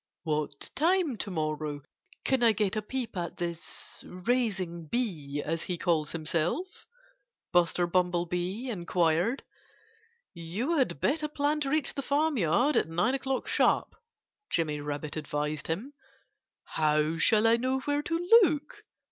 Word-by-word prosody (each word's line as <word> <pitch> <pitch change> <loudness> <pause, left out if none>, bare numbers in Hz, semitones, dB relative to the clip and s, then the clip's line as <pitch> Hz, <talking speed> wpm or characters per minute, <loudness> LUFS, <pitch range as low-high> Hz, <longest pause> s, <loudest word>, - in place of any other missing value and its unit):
"What 150 -3 -3
time 335 -3 +2
to 205 - -3
morrow 155 -4 -3 0.4
can 265 -2 +2
I 230 -2 +5
get 210 -2 0
a 215 - 0
peep 245 +1 -4
at 175 -2 -4
this 170 -1 -6
'raising 185 -5 -1
bee,' 150 - -2
as 165 +1 -1
he 180 - -3
calls 160 -4 +1
himself?" 165 - -2 0.7
Buster 175 0 +3
Bumblebee 180 +5 0
inquired. 175 - +1 0.9
"You 210 - -2
had 255 - 0
better 305 +2 +1
plan 295 0 0
to 280 -2 -1
reach 305 -1 +1
the 275 - -3
farmyard 280 - +2
at - - +1
nine 175 +10 +1
o'clock 270 -1 -2
sharp," - - +2 0.6
Jimmy 150 -3 0
Rabbit 145 +1 -4
advised 150 0 -3
him. 210 - -3 0.7
"How 155 +1 +1
shall 215 +4 +4
I 225 +1 +5
know 260 +2 0
where 290 +1 0
to 335 +3 -3
look?" 300 -5 0
180 Hz, 135 wpm, -29 LUFS, 160-265 Hz, 0.9 s, I